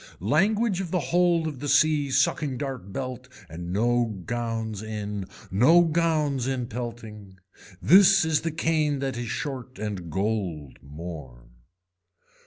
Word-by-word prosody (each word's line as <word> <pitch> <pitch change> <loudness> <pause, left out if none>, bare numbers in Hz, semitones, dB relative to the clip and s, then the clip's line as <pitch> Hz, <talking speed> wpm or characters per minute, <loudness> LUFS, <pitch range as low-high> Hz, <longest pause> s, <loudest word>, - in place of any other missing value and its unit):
Language 195 - +1
of 180 - -5
the 180 - 0
hold 170 +3 +2
of 150 -5 -4
the 145 +1 -4
sea 150 -2 +3
sucking 135 +1 +1
dart 130 -8 -5
belt 125 +2 -5 0.2
and 85 +2 -7
no 120 +4 +2 0.2
gowns 115 -3 -3
in, 105 -3 -5 0.2
no 150 - +6
gowns 155 -5 0
in 130 -2 -1
pelting. 110 -5 -8 0.5
This 195 0 +6
is 160 -2 +1
the 165 - -2
cane 155 -2 0
that 135 -2 -3
is 120 0 -4
short 130 0 -5
and 100 -5 -5
gold 95 - -3
more. 70 -5 -9
125 Hz, 135 wpm, -26 LUFS, 105-155 Hz, 0.5 s, no